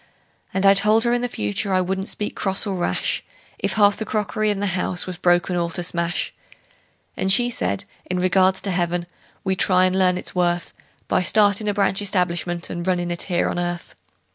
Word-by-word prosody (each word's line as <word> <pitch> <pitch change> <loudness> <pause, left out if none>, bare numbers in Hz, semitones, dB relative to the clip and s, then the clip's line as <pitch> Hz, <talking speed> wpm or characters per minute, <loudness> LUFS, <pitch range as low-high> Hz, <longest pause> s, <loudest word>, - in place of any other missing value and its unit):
And 190 +1 -1
I 195 - +8
told 215 +3 +5
her 240 0 +2
in 245 - +1
the 245 - 0
future 105 - -3
I 185 - +3
wouldn't 190 +2 -2
speak 210 - -4
cross 190 +2 +1
or 200 - -2
rash 175 - -1 0.4
If - - -1
half 205 -2 +4
the - - -3
crockery 215 0 -1
in 205 -2 -1
the 205 - -1
house 180 -1 0
was 185 -1 -6
broken 175 0 +2
all 170 -1 0
to 175 +2 -4
smash; 170 0 -2 0.8
And 190 - 0
she 245 +4 +4
said, 100 - -2 0.2
in 180 - -2
regards 185 +1 +2
to 195 - -1
heaven, 175 -1 -1 0.4
we'd 190 -1 -1
try 185 -1 +4
and 185 0 0
learn 185 -1 +3
its - - -8
worth 175 -1 0 0.3
By - - +1
startin' 205 +2 +3
a 205 - +1
branch 200 -1 +2
establishment 175 -3 -1
and 175 +1 -5
runnin' 175 -1 0
it 175 - -3
here 175 -1 +1
on - - -2
earth. 175 0 -4
185 Hz, 205 wpm, -22 LUFS, 175-200 Hz, 0.8 s, I